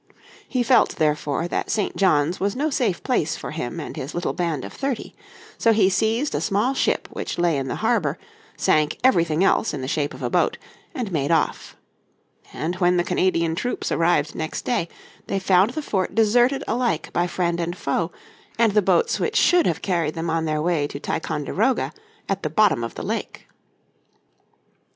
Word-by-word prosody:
He 255 -2 0
felt 250 +1 +4
therefore 150 +1 0
that - - -2
St. 210 -3 -1
John's 170 -3 +2
was 200 +1 -1
no 300 +4 0
safe 220 -10 0
place 250 - 0
for - - -7
him 155 0 -4
and 150 - -6
his 135 +3 -6
little 175 - -1
band 165 -7 -2
of - - -9
thirty. 270 -4 -3 0.5
So 230 - +4
he 200 -3 +4
seized 225 +8 +1
a - - -1
small 215 +6 +1
ship - - 0
which - - -5
lay 175 -2 +2
in 135 -1 -2
the 125 - -3
harbour, - - +1 0.4
sank 150 -1 +2
everything 170 -9 +3
else 195 - +2
in 140 - -5
the 130 - -4
shape 145 +1 -1
of - - -9
a - - 0
boat, - - +2 0.4
and 235 -6 -3
made 145 -4 -1
off. 165 - 0 0.7
And 175 +3 -3
when 180 -1 +3
the 175 - +2
Canadian 170 -2 +1
troops 245 +9 -3
arrived 165 -3 +2
next 160 0 -4
day 205 -9 0 0.4
they 195 - -1
found 190 +1 +3
the 310 - -3
fort 190 -8 -1
deserted 240 +5 +3
alike 240 +1 -1
by 175 +1 +1
friend 170 -1 -1
and 175 +1 -3
foe, 165 +4 -1 0.5
and 230 -2 +4
the 210 +1 +3
boats 470 - +2
which - - -1
should 355 -2 +4
have - - -1
carried 170 -5 0
them 165 0 -2
on 165 0 0
their 155 -1 -1
way 165 -4 +1
to 140 - -7
Ticonderoga 160 - -1 0.3
at 195 -1 -1
the 155 - -2
bottom 175 - +3
of 115 - -5
the - - -6
lake. - - -4
175 Hz, 190 wpm, -23 LUFS, 160-220 Hz, 0.7 s, felt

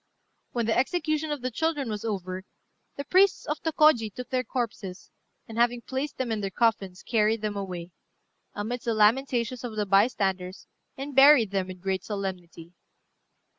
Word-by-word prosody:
When 235 -2 -1
the 225 - +1
execution 310 +2 0
of 295 -3 -3
the 255 - -2
children 295 +1 -1
was 210 -2 -4
over, 190 -4 -4 0.5
the 280 - -4
priests 380 +5 +3
of 300 -1 -3
Tôkôji 305 -9 +3
took 250 +5 -8
their 255 -1 +1
corpses, 220 -6 -5 0.4
and, 225 +1 -6
having 240 0 +2
placed 275 +3 -4
them 255 -3 -2
in 215 -1 -1
their 195 - -2
coffins, 195 -4 0
carried 220 -1 +1
them 210 -1 -2
away, 180 -3 -5 0.6
amidst 230 +4 -4
the 230 -2 0
lamentations 235 +2 +2
of 235 -3 -5
the 210 -1 0
bystanders, 195 -2 +1 0.3
and 275 0 -6
buried 270 -6 +7
them 190 -2 -1
with 185 -1 -9
great 190 -1 -1
solemnity. 180 -4 -6
225 Hz, 165 wpm, -27 LUFS, 195-260 Hz, 0.6 s, buried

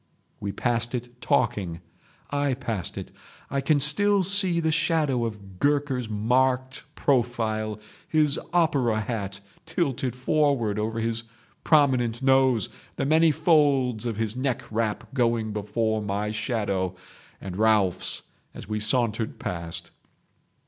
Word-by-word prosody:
"We 100 - -3
passed 120 +2 +1
it 120 0 -7
talking. 105 -12 0 0.5
I 145 -2 0
passed 115 -8 -4
it. - - -7 0.4
I 140 0 0
can 145 +2 +2
still 195 +8 +5
see 190 -2 +7
the 160 -1 +1
shadow 150 -5 +1
of 100 -4 -8
Gurker's 140 -5 0
marked 130 +5 0
profile, 110 -5 0 0.3
his 150 -2 +2
opera 140 -10 +2
hat 100 -3 -4 0.3
tilted 135 -7 -1
forward 130 -6 +1
over 110 +1 -2
his 115 0 -2 0.4
prominent 130 -6 +2
nose, 130 -5 +3 0.3
the - - -2
many 160 +3 +4
folds 145 -7 +2
of 115 -3 -3
his 110 0 -1
neck 130 -1 -2
wrap 110 +1 -2
going 115 -4 0
before 110 +1 -1
my 105 +1 -2
shadow 100 -5 -2 0.4
and 95 -2 -7
Ralphs' 105 -3 +1 0.3
as - - -9
we 105 0 -2
sauntered 110 0 -1
past. 85 -2 -6
120 Hz, 125 wpm, -25 LUFS, 110-140 Hz, 0.5 s, see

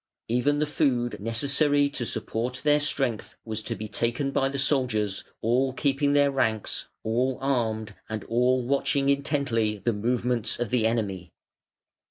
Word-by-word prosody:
Even 125 +5 +1
the 150 - +1
food 125 -5 0
necessary 140 +6 +2
to 125 -5 -3
support 125 +3 -3
their 150 0 +4
strength 135 -6 -1
was 110 -1 -3
to - - -4
be 110 - -6
taken 120 +6 -1
by 135 0 +1
the 140 - -4
soldiers, 125 -8 +1 0.2
all 125 +4 +2
keeping 140 +1 +1
their 145 -1 +4
ranks, 110 -6 0 0.2
all 125 +4 0
armed, 115 -5 -1 0.2
and 110 -1 -4
all 125 +1 +1
watching 140 +1 +1
intently 140 -6 0
the 115 +3 -1
movements 120 +2 0
of 120 -3 -2
the 120 -3 +3
enemy. 100 -7 -2
125 Hz, 150 wpm, -26 LUFS, 110-140 Hz, 0.2 s, their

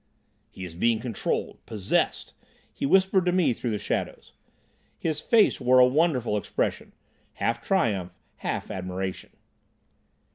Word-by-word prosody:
"He 95 - -8
is 85 - -9
being 110 +6 +1
controlled—possessed," 110 -3 -2 0.4
he - - -2
whispered 190 +2 +4
to - - +4
me 180 -7 +3
through 120 - -4
the 105 - -1
shadows. - - -4 0.6
His 155 -2 -2
face 220 - +3
wore 125 +1 +4
a 125 - +8
wonderful 125 -5 +1
expression, 100 - -2 0.4
half 115 +1 -1
triumph, 105 - 0 0.3
half - - -4
admiration. 95 0 -4
120 Hz, 120 wpm, -26 LUFS, 95-160 Hz, 0.6 s, a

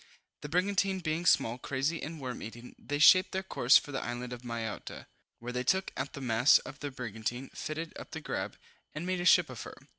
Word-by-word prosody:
The 150 - -6
brigantine 190 +3 +1
being 165 0 -2
small, 115 +2 +3
crazy 140 +6 -1
and 160 +1 -6
worm 130 -3 -5
eaten, 120 +2 -9
they 145 - -3
shaped 185 +5 +7
their 190 0 -1
course 130 -9 +5
for 145 - -4
the 135 - -2
island 120 +1 -4
of 120 - -8
Mayotta, 115 -3 -5 0.3
where 120 +1 -6
they 125 0 -2
took 190 +7 +1
out 135 +1 -4
the 140 - -7
masts 125 +4 +5
of 135 - -9
the 145 - -4
brigantine, 120 0 -5
fitted 155 +1 -5
up - - -9
the - - -6
grab, - - -4 0.4
and 155 +3 -4
made 185 -1 -1
a - - -3
ship 175 -1 +6
of 130 -4 -8
her. - - -9
140 Hz, 215 wpm, -31 LUFS, 125-165 Hz, 0.4 s, shaped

